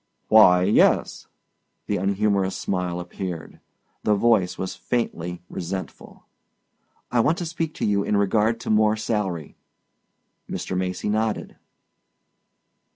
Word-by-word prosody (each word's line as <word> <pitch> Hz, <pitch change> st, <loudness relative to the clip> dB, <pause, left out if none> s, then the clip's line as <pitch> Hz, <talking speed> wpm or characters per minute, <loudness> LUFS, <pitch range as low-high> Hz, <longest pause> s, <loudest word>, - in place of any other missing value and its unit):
"Why 90 Hz, -5 st, +7 dB
yes." 100 Hz, +3 st, +2 dB, 0.6 s
The 105 Hz, -, -1 dB
unhumorous 100 Hz, 0 st, +1 dB
smile 90 Hz, -2 st, -2 dB
appeared. 90 Hz, -1 st, -6 dB, 0.4 s
The 105 Hz, -, +2 dB
voice 105 Hz, -4 st, +2 dB
was 95 Hz, -, -4 dB
faintly 90 Hz, -8 st, -3 dB
resentful. 95 Hz, +2 st, -7 dB, 0.9 s
"I 125 Hz, -, +2 dB
want 155 Hz, +8 st, +3 dB
to 175 Hz, -, -3 dB
speak 165 Hz, -1 st, -3 dB
to -, -, -2 dB
you 100 Hz, -1 st, +1 dB
in 105 Hz, -, +1 dB
regard 105 Hz, +3 st, +2 dB
to -, -, -2 dB
more 110 Hz, 0 st, +3 dB
salary." 100 Hz, -8 st, -3 dB, 0.9 s
Mr. 95 Hz, -, -4 dB
Macy 90 Hz, +1 st, -2 dB
nodded. 110 Hz, +1 st, -1 dB
100 Hz, 115 wpm, -24 LUFS, 90-110 Hz, 0.9 s, Why